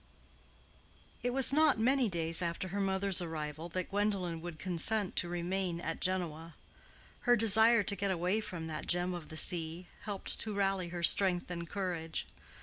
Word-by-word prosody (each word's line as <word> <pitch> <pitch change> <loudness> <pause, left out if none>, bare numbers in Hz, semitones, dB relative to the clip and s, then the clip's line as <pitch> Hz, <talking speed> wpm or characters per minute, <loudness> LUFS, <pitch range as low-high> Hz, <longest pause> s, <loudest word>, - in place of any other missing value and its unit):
It 245 - -1
was 265 +1 +4
not 310 -4 +4
many 250 +1 +2
days 165 -2 +1
after 170 +2 -3
her 200 +2 -3
mother's 195 -1 +1
arrival 160 -1 -5
that 185 +2 -4
Gwendolen 195 -5 -1
would 170 -2 -7
consent 190 +4 -1
to 175 - +1
remain 175 0 -2
at 165 -1 -4
Genoa. 170 -3 -3 0.6
Her 245 -1 +3
desire 220 +1 +5
to 200 - +1
get 200 +1 -2
away 185 +4 0
from 175 -6 -6
that 160 -1 -6
gem 175 +1 0
of 170 -3 -8
the 155 - -6
sea, 170 +1 +4 0.2
helped 205 -3 -3
to 215 -2 -4
rally 195 -2 0
her 170 0 -6
strength 180 +1 +3
and 170 -1 -6
courage. 175 -5 -4
180 Hz, 165 wpm, -32 LUFS, 170-200 Hz, 0.6 s, desire